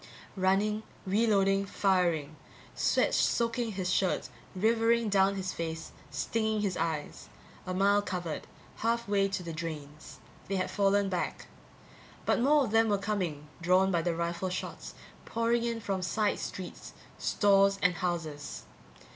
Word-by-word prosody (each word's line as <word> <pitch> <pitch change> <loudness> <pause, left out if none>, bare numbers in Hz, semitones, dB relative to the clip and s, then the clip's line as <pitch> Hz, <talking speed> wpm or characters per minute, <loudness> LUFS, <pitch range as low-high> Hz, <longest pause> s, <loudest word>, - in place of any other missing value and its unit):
Running, 200 +3 +2 0.2
re 210 +5 +2
loading, 195 -2 +3
firing. 175 -7 +1 0.4
Sweat - - +2
soaking 230 -1 +1
his 185 -1 -1
shirt, 190 -2 +1 0.3
rivering 225 +2 +2
down 195 0 +3
his 190 -1 -3
face, 160 -1 -5 0.2
stinging 220 -1 -1
his 195 -3 0
eyes. 160 -2 -3 0.4
A 185 - -2
mile 200 +2 +4
covered. 175 -5 -4 0.3
Half 235 0 0
way 200 -1 +2
to 190 -2 -3
the 165 -1 -5
drains. 155 -2 -7 0.3
They 195 - -1
had 185 - -1
fallen 200 0 +2
back. 180 -2 -3 0.8
But - - +2
more 285 +4 +4
of 215 - -5
them 225 0 +4
were 205 - +3
coming, 185 -8 -2
drawn 185 +3 +4
by 170 -2 +2
the 170 0 -1
rifle 170 +2 -2
shots, 180 - -5 0.3
pouring 230 +1 +1
in 235 -1 -1
from 195 -3 -2
side 210 +3 0
streets, 185 -2 -7 0.3
stores 195 -1 +4
and 180 0 +4
houses. 165 -4 -4
195 Hz, 145 wpm, -30 LUFS, 175-210 Hz, 0.8 s, mile